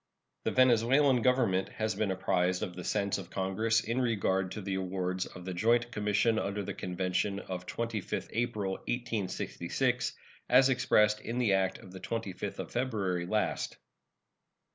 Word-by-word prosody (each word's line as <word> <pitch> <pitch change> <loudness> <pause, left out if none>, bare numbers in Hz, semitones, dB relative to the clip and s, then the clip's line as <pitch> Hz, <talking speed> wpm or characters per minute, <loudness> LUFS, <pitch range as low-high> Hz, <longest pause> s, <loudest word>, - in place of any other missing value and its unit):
The - - +1
Venezuelan 130 +2 +4
Government 110 -7 +2
has 110 -1 -2
been 105 0 -1
apprised 90 -1 +1
of 90 - -4
the 90 - -6
sense 100 0 0
of 90 -3 -9
Congress 110 +5 +1
in 115 +4 -1
regard 95 -6 +1
to 105 - -5
the 95 0 -3
awards 95 -1 -2
of 90 -1 -11
the 95 - -3
joint 120 +6 +2
commission 105 +1 +2
under 100 0 -2
the - - -4
convention 95 +2 -1
of 90 -2 -6
25th 115 -4 -3
April, 110 -5 -1
1866, 115 -1 -2 0.4
as 130 +2 +6
expressed 105 -5 +3
in 115 - -4
the 120 -5 +3
act 95 0 +1
of 95 - -13
the 95 - -9
25th 100 -2 -4
of - - -6
February 100 -8 -1
last. 105 +2 -1
105 Hz, 155 wpm, -31 LUFS, 95-115 Hz, 0.4 s, as